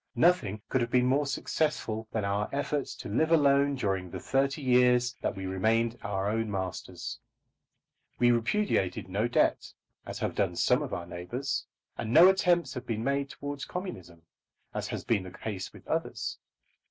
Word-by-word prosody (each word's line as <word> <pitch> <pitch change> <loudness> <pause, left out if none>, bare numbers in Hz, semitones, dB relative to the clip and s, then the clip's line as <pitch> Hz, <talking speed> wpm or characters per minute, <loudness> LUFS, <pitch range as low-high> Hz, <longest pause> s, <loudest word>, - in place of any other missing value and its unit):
Nothing 115 - +2
could 130 - +1
have 120 - 0
been 125 0 +3
more 135 +3 +2
successful 135 -6 -1
than 110 -3 -1
our 100 +1 0
efforts 145 0 -2
to - - -8
live 155 +10 +1
alone 140 -2 +4
during 95 -7 -1
the - - -6
thirty 135 +2 0
years 125 -1 +4
that - - -1
we 95 -1 -5
remained 110 +5 +1
our 100 -1 -2
own 110 +1 0
masters. 95 -3 -4 1.0
We 120 0 +5
repudiated 120 - 0
no 105 +5 0
debt, 120 - +1 0.4
as - - -5
have - - -2
done - - 0
some - - +3
of - - -4
our 85 - -3
neighbours; 90 +11 -4 0.3
and 110 - -3
no 170 +9 +9
attempts 175 -7 +2
have 125 0 -7
been 110 -1 -2
made 140 +1 0
towards 145 0 -6
communism, 90 - -7 0.5
as - - -3
has - - -4
been 110 -4 +1
the 95 - -8
case 95 0 -6
with - - -15
others. - - -2
120 Hz, 170 wpm, -29 LUFS, 100-140 Hz, 1.0 s, no